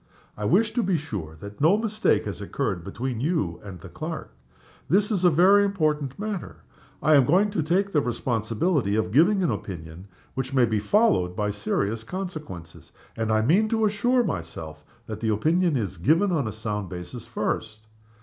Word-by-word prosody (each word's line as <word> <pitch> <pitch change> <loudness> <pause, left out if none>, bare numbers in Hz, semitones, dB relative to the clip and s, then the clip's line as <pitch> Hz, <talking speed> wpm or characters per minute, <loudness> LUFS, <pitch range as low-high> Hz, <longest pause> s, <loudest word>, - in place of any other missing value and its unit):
I 105 - -4
wish 210 - +3
to 245 - +1
be 190 -4 +1
sure 100 - -6
that 100 +3 -9
no 165 +7 +5
mistake 215 -1 +1
has - - -5
occurred 85 -3 -2
between 120 +5 -4
you 115 - -1
and 95 -3 -9
the - - -10
clerk. - - -6 0.6
This 205 +4 +3
is 190 -4 0
a 180 - +7
very 190 +5 +5
important 155 -8 0
matter. 210 -3 -5 0.4
I 155 +1 +5
am 140 -3 +7
going 190 +10 +3
to 185 - 0
take 185 +6 +1
the 150 - +3
responsibility 120 - 0
of 110 -1 0
giving 180 - +4
an 170 - +2
opinion 85 0 -7 0.3
which 130 +1 -3
may 125 -2 +5
be 110 -2 0
followed 105 - +2
by 105 0 -1
serious 105 +1 -1
consequences; 150 - -7 0.2
and 110 -1 -1
I 110 0 +3
mean 195 - +3
to 220 -1 +2
assure 240 +5 +2
myself 80 - -5 0.2
that 110 -1 -6
the 110 - -1
opinion 160 - +2
is 100 -5 -3
given 165 - +3
on 145 -9 0
a - - -3
sound 105 -3 -4
basis, 90 +6 -8
first. 110 -1 -3
135 Hz, 180 wpm, -25 LUFS, -, 0.6 s, a